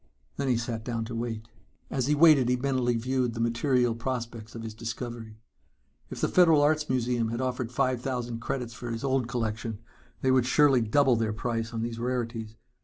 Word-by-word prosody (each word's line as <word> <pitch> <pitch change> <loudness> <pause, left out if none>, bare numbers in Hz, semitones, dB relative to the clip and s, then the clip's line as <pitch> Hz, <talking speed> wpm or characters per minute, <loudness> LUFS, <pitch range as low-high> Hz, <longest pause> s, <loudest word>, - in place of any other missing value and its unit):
Then 140 - -1
he 125 -2 +3
sat 115 -1 -3
down 115 -2 -3
to 115 +1 -6
wait. 115 -1 -4 0.4
As 130 -2 0
he 150 - +3
waited 150 -5 +6
he 125 - +3
mentally 125 -2 0
viewed 125 0 -1
the - - -5
material 120 +1 +2
prospects 115 -2 -5
of 115 - -6
his 110 -1 -6
discovery. 115 0 -6 0.7
If - - -7
the - - +3
Federal 165 -5 +5
Arts 150 0 +2
Museum 120 -2 +1
had 115 +1 -3
offered 130 -2 -2
five 125 0 0
thousand 120 -3 -3
credits 120 0 -4
for 120 +1 -7
his 115 +1 -4
old 135 -3 +1
collection, 115 -3 -3 0.4
they 130 - +2
would 130 -2 +3
surely 135 -2 +5
double 125 +3 +3
their 110 -1 0
price 115 0 -2
on 115 -1 -3
these 115 0 -4
rarities. 115 -3 -3
120 Hz, 190 wpm, -28 LUFS, 115-130 Hz, 0.7 s, waited